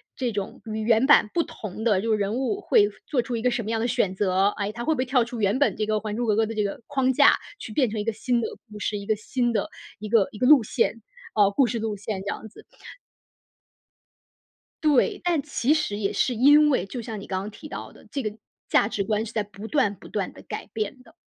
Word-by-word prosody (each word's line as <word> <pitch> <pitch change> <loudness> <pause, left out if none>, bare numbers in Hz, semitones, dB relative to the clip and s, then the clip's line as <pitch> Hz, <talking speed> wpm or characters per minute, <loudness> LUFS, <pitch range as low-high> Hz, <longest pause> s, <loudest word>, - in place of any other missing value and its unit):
这 250 -3 -1
种 200 -2 -5
与 220 -1 -4
原 225 +3 +3
版 270 -7 +6
不 335 - +3
同 215 +1 -8
的 210 -5 +3
就 225 +1 -1
是 215 - +3
人 205 0 -1
物 270 +11 -1
会 415 -3 +4 0.2
做 265 -5 +1
出 245 0 -4
一 225 - -5
个 250 - +3
什 240 -1 -1
么 215 - -5
样 225 0 0
的 235 - 0
选 200 -5 0
择， 190 0 +2
哎， 205 -1 -2
它 235 +2 -6
会 315 - +2
不 - - -8
会 255 - 0
跳 250 -1 +3
出 235 0 -6
原 205 +4 +1
本 285 - +3
这 215 - 0
个 215 - -1
《还 210 -1 -4
珠 240 +2 -1
格 215 -2 +2
格》 225 - +3
的 225 - -5
这 210 - +1
个 200 +3 -4
框 265 -2 +1
架， - - +6 0.2
去 - - -8
变 245 0 +1
成 215 -1 -2
一 - - -3
个 225 - 0
新 240 +3 0
的 - - -1 0.2
故 210 - -8
事， 210 0 -2
一 200 - -7
个 215 - +1
新 240 +3 -1
的 220 - -1 0.3
一 215 - -6
个 215 -3 +4
一 210 - -10
个 250 - +1
路 285 -4 +7
线， 230 +1 0 0.3
呃， 200 -1 +5
故 250 +4 +3
事 230 +1 -2
路 215 -1 -3
线 200 -1 -4
这 - - -7
样 220 - -4
子。 - - -16 2.2
对， 295 -4 +3
但 345 -5 +1
其 290 -1 +1
实 300 -10 -1
也 200 -2 -1
是 255 - +1
因 290 +5 +6
为 225 -9 +1
就 240 +5 -5
像 220 -3 -6
你 - - -10
刚 185 -1 -2
刚 210 - -6
提 305 +8 -11
到 - - -7
的， - - -18
这 275 - -3
个 215 -1 -3 0.3
价 - - +3
值 205 -2 -2
观 215 +1 0
是 230 - -8
在 215 -2 -1
不 205 +2 -10
断 240 -9 +2
不 - - -14
断 - - -3
地 - - -13
改 - - -6
变 225 +4 -4
的。 - - -20
225 Hz, 285 characters per minute, -25 LUFS, 210-255 Hz, 2.2 s, 路